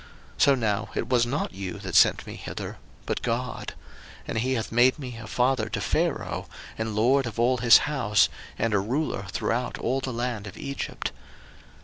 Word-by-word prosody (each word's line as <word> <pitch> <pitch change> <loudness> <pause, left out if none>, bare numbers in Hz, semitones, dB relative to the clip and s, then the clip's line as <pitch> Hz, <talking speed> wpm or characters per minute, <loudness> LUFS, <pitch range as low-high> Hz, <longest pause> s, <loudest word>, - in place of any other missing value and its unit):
01:045:008 - - -4
So 140 - +5
now 105 -4 -1
it 115 - -2
was 120 -2 +4
not 135 -3 -2
you 95 -1 -5
that - - -7
sent - - +5
me - - -7
hither, - - -6 0.3
but - - -2
God: 120 0 -3 0.5
and - - -1
he 130 +3 0
hath 115 -2 -3
made 125 +4 +4
me 125 -5 -7
a 115 - -8
father 125 -3 +1
to - - -2
Pharaoh, - - -1 0.3
and 110 -1 -3
lord 125 +5 +3
of 115 0 -6
all 125 +2 +3
his 120 -1 +8
house, 120 - +3 0.3
and 115 -2 0
a 100 - +4
ruler 110 -2 -2
throughout 120 +6 -1
all 130 +3 0
the 130 -1 -4
land 120 -3 -3
of 95 - -9
Egypt. 140 0 -4
120 Hz, 190 wpm, -26 LUFS, 110-130 Hz, 0.5 s, his